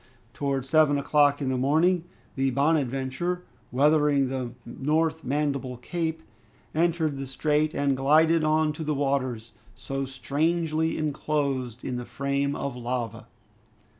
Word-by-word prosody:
Towards 135 Hz, -2 st, -2 dB
seven 150 Hz, -1 st, +4 dB
o'clock 145 Hz, 0 st, +3 dB
in 130 Hz, -, 0 dB
the 130 Hz, -1 st, 0 dB
morning, 165 Hz, +6 st, +2 dB, 0.3 s
the 135 Hz, 0 st, +1 dB
"Bonadventure," 140 Hz, +4 st, 0 dB, 0.3 s
weathering 145 Hz, 0 st, +3 dB
the 130 Hz, -2 st, -3 dB
North 155 Hz, +6 st, 0 dB
Mandible 140 Hz, -2 st, -1 dB
Cape, 160 Hz, +4 st, -3 dB, 0.5 s
entered 160 Hz, -3 st, +1 dB
the 135 Hz, -, -4 dB
strait 150 Hz, +3 st, 0 dB
and 140 Hz, -1 st, +1 dB
glided 155 Hz, +4 st, +4 dB
on 155 Hz, 0 st, +2 dB
to 160 Hz, -, -6 dB
the 150 Hz, -1 st, -1 dB
waters, 130 Hz, -5 st, -1 dB, 0.2 s
so 135 Hz, +3 st, -4 dB
strangely 160 Hz, +4 st, 0 dB
enclosed 140 Hz, -5 st, -2 dB
in 125 Hz, -2 st, -2 dB
the 125 Hz, -, -5 dB
frame 140 Hz, +3 st, -1 dB
of 140 Hz, -2 st, -3 dB
lava. 120 Hz, -2 st, -4 dB
140 Hz, 130 wpm, -26 LUFS, 130-155 Hz, 0.5 s, seven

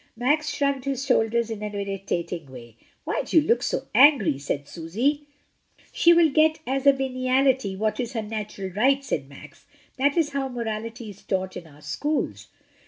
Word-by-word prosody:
Max 295 Hz, +5 st, +1 dB
shrugged 280 Hz, -2 st, -1 dB
his 275 Hz, -1 st, -2 dB
shoulders 235 Hz, -3 st, +1 dB
in 215 Hz, -2 st, -5 dB
an 210 Hz, -1 st, -5 dB
irritating 190 Hz, -6 st, -4 dB
way. 120 Hz, -3 st, -12 dB, 0.3 s
"Why -, -, -1 dB
do 325 Hz, -, +4 dB
you 300 Hz, -, -2 dB
look 465 Hz, -, +3 dB
so -, -, -1 dB
angry?" 245 Hz, -, +5 dB
said 140 Hz, 0 st, -3 dB
Susy. 245 Hz, -, -2 dB, 0.6 s
"She 340 Hz, -, +5 dB
will 335 Hz, -3 st, +5 dB
get 310 Hz, +2 st, +4 dB
as 270 Hz, +2 st, -1 dB
a -, -, +10 dB
veniality 260 Hz, -4 st, +1 dB
what 215 Hz, +3 st, -1 dB
is 245 Hz, 0 st, -3 dB
her 225 Hz, -3 st, -2 dB
natural 210 Hz, -3 st, -5 dB
right," 270 Hz, +8 st, +2 dB
said 135 Hz, -, -3 dB
Max. 145 Hz, +1 st, -14 dB, 0.3 s
"That 285 Hz, +4 st, +1 dB
is 310 Hz, -3 st, +2 dB
how 275 Hz, -1 st, -2 dB
morality 230 Hz, -1 st, -5 dB
is 200 Hz, -, -16 dB
taught 190 Hz, -1 st, -2 dB
in 175 Hz, -2 st, -8 dB
our 150 Hz, -1 st, -18 dB
schools." 290 Hz, -, -3 dB
235 Hz, 175 wpm, -25 LUFS, 195-275 Hz, 0.6 s, a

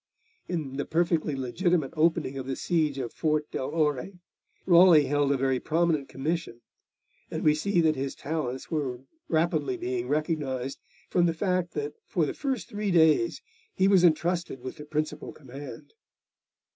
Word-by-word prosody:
In 150 Hz, -6 st, -3 dB
the 145 Hz, -, -2 dB
perfectly 165 Hz, -3 st, +1 dB
legitimate 150 Hz, +4 st, 0 dB
opening 160 Hz, -3 st, +1 dB
of 135 Hz, -1 st, -5 dB
the 135 Hz, -, -2 dB
siege 155 Hz, -5 st, 0 dB
of 125 Hz, -4 st, -4 dB
Fort 155 Hz, -1 st, 0 dB
del 130 Hz, -, -3 dB
Ore, 150 Hz, +2 st, 0 dB, 0.5 s
Raleigh 170 Hz, -4 st, +7 dB
held 145 Hz, 0 st, +1 dB
a 140 Hz, -, +2 dB
very 130 Hz, -1 st, +1 dB
prominent 160 Hz, -3 st, 0 dB
commission, 145 Hz, -3 st, -3 dB, 0.7 s
and -, -, -4 dB
we 150 Hz, -, +5 dB
see 175 Hz, +4 st, +1 dB
that 155 Hz, -1 st, +3 dB
his 135 Hz, 0 st, -3 dB
talents 140 Hz, -4 st, -4 dB
were 135 Hz, -6 st, -2 dB, 0.3 s
rapidly 170 Hz, -, +1 dB
being 365 Hz, +1 st, -3 dB
recognised, 145 Hz, -4 st, -2 dB, 0.3 s
from 175 Hz, -1 st, +3 dB
the 165 Hz, -, 0 dB
fact 180 Hz, -1 st, -1 dB
that 150 Hz, 0 st, -3 dB
for 165 Hz, -, +1 dB
the -, -, -3 dB
first 265 Hz, -6 st, -3 dB
three 210 Hz, -2 st, -3 dB
days 170 Hz, -, +3 dB, 0.3 s
he 190 Hz, -, +3 dB
was 195 Hz, -3 st, +5 dB
entrusted 170 Hz, -2 st, +1 dB
with 130 Hz, -, -7 dB
the 150 Hz, -, -9 dB
principal 155 Hz, +1 st, -3 dB
command. 135 Hz, -, -10 dB
155 Hz, 160 wpm, -27 LUFS, 140-175 Hz, 0.7 s, Raleigh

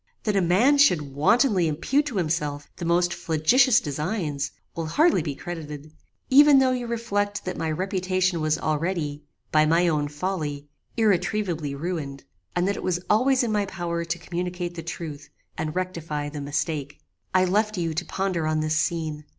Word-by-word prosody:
That 210 Hz, -2 st, 0 dB
a 195 Hz, -, +3 dB
man 220 Hz, +12 st, +4 dB
should 155 Hz, -, +3 dB
wantonly 190 Hz, -, +3 dB
impute 260 Hz, -, 0 dB
to 245 Hz, -8 st, -4 dB
himself 150 Hz, -4 st, -2 dB
the 170 Hz, -, -5 dB
most 175 Hz, +1 st, +2 dB
flagitious 235 Hz, -, +3 dB
designs, 150 Hz, -, -2 dB, 0.3 s
will 165 Hz, -1 st, -3 dB
hardly 305 Hz, -, +3 dB
be 150 Hz, -3 st, -4 dB
credited, 155 Hz, -2 st, -7 dB, 0.4 s
even 290 Hz, +1 st, +8 dB
though 265 Hz, -1 st, +4 dB
you 250 Hz, -1 st, -2 dB
reflect 205 Hz, -3 st, -2 dB
that 185 Hz, -, -3 dB
my 160 Hz, -, -2 dB
reputation 185 Hz, +1 st, 0 dB
was 155 Hz, 0 st, +1 dB
already, 155 Hz, -2 st, -2 dB, 0.3 s
by 155 Hz, 0 st, +4 dB
my 170 Hz, +3 st, +3 dB
own 150 Hz, -3 st, +1 dB
folly, 150 Hz, -2 st, -4 dB, 0.3 s
irretrievably 185 Hz, -8 st, 0 dB
ruined; 145 Hz, -3 st, -4 dB, 0.3 s
and 175 Hz, +1 st, +1 dB
that 200 Hz, -, 0 dB
it -, -, -5 dB
was 180 Hz, -1 st, 0 dB
always 255 Hz, +4 st, +3 dB
in 230 Hz, -, -1 dB
my 205 Hz, -2 st, 0 dB
power 170 Hz, -2 st, -3 dB
to 170 Hz, +1 st, -3 dB
communicate 175 Hz, +1 st, -4 dB
the 170 Hz, -, -6 dB
truth, 160 Hz, -3 st, -7 dB, 0.3 s
and 155 Hz, +1 st, -4 dB
rectify 165 Hz, -5 st, -3 dB
the 145 Hz, 0 st, -6 dB
mistake. 145 Hz, 0 st, -3 dB, 0.4 s
"I 185 Hz, 0 st, +5 dB
left 210 Hz, +3 st, +1 dB
you 165 Hz, -2 st, -1 dB
to 170 Hz, +3 st, -2 dB
ponder 185 Hz, -5 st, -1 dB
on 155 Hz, 0 st, +1 dB
this 155 Hz, 0 st, 0 dB
scene. 160 Hz, -3 st, -2 dB
170 Hz, 170 wpm, -25 LUFS, 155-195 Hz, 0.4 s, even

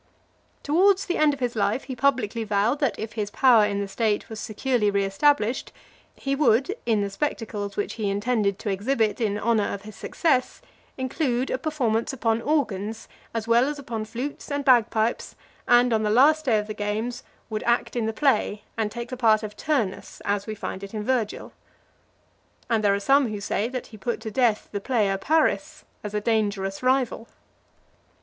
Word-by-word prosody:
LIV. -, -, -39 dB
Towards 375 Hz, +6 st, +3 dB
the 360 Hz, -, -1 dB
end 305 Hz, -1 st, +5 dB
of -, -, -16 dB
his 245 Hz, -2 st, -2 dB
life, 215 Hz, +4 st, 0 dB
he 260 Hz, -1 st, -6 dB
publicly 240 Hz, -4 st, +1 dB
vowed, 215 Hz, +6 st, +1 dB
that 275 Hz, -7 st, 0 dB
if 220 Hz, 0 st, -6 dB
his 210 Hz, -3 st, -3 dB
power 235 Hz, -2 st, +5 dB
in 200 Hz, -1 st, -1 dB
the 200 Hz, -, -3 dB
state 210 Hz, +1 st, -1 dB
was 220 Hz, -, -6 dB
securely 225 Hz, 0 st, 0 dB
re 200 Hz, 0 st, +1 dB
established, 240 Hz, +3 st, +1 dB, 0.4 s
he 275 Hz, 0 st, -2 dB
would, 275 Hz, -, +2 dB
in 220 Hz, -3 st, +2 dB
the 200 Hz, -, -1 dB
spectacles 210 Hz, -5 st, -3 dB
which 205 Hz, -, -2 dB
he 215 Hz, -3 st, -2 dB
intended 205 Hz, -1 st, 0 dB
to 205 Hz, -, -3 dB
exhibit 220 Hz, +2 st, 0 dB
in 205 Hz, -2 st, 0 dB
honour 215 Hz, -1 st, +1 dB
of 200 Hz, -, -6 dB
his 215 Hz, -1 st, -10 dB
success, 275 Hz, -7 st, 0 dB, 0.4 s
include 260 Hz, -1 st, -1 dB
a 255 Hz, -, -1 dB
performance 250 Hz, -8 st, 0 dB
upon 230 Hz, -3 st, 0 dB
organs, 225 Hz, -7 st, -1 dB, 0.2 s
as 225 Hz, -1 st, -4 dB
well 235 Hz, +2 st, +4 dB
as 295 Hz, +1 st, -3 dB
upon 235 Hz, -6 st, -4 dB
flutes 250 Hz, +8 st, -6 dB
and 285 Hz, -1 st, -2 dB
bagpipes, 230 Hz, -3 st, +2 dB, 0.3 s
and, 245 Hz, 0 st, +5 dB
on 220 Hz, -, +2 dB
the 210 Hz, -, 0 dB
last 300 Hz, +8 st, +4 dB
day 230 Hz, -5 st, +3 dB
of 210 Hz, -, -1 dB
the 215 Hz, -, -5 dB
games, 215 Hz, +4 st, -3 dB, 0.3 s
would 215 Hz, -, -2 dB
act 240 Hz, +1 st, 0 dB
in 230 Hz, -2 st, 0 dB
the -, -, 0 dB
play, 220 Hz, -5 st, +1 dB
and 220 Hz, -2 st, -1 dB
take 235 Hz, +2 st, -6 dB
the 255 Hz, -, -4 dB
part 220 Hz, -3 st, +3 dB
of 210 Hz, -1 st, -6 dB
Turnus, 255 Hz, -11 st, -2 dB
as 205 Hz, 0 st, -1 dB
we 215 Hz, -, -4 dB
find 195 Hz, -1 st, -6 dB
it 200 Hz, +2 st, -8 dB
in 210 Hz, -, -3 dB
Virgil. 235 Hz, -3 st, -2 dB, 1.2 s
And 220 Hz, -2 st, +2 dB
there 200 Hz, -1 st, +4 dB
are -, -, -2 dB
some 270 Hz, +6 st, +3 dB
who 210 Hz, -2 st, -4 dB
say, 200 Hz, +2 st, -1 dB
that 255 Hz, -1 st, -5 dB
he 220 Hz, -, -13 dB
put 230 Hz, +4 st, -3 dB
to 220 Hz, -1 st, -5 dB
death 230 Hz, -2 st, +1 dB
the 205 Hz, -, -3 dB
player 210 Hz, -5 st, +1 dB
Paris 310 Hz, +3 st, 0 dB, 0.2 s
as 210 Hz, 0 st, -5 dB
a 210 Hz, -, 0 dB
dangerous 205 Hz, -3 st, -1 dB
rival. 255 Hz, -2 st, +1 dB
LV. -, -, -31 dB
225 Hz, 195 wpm, -25 LUFS, 210-260 Hz, 1.2 s, end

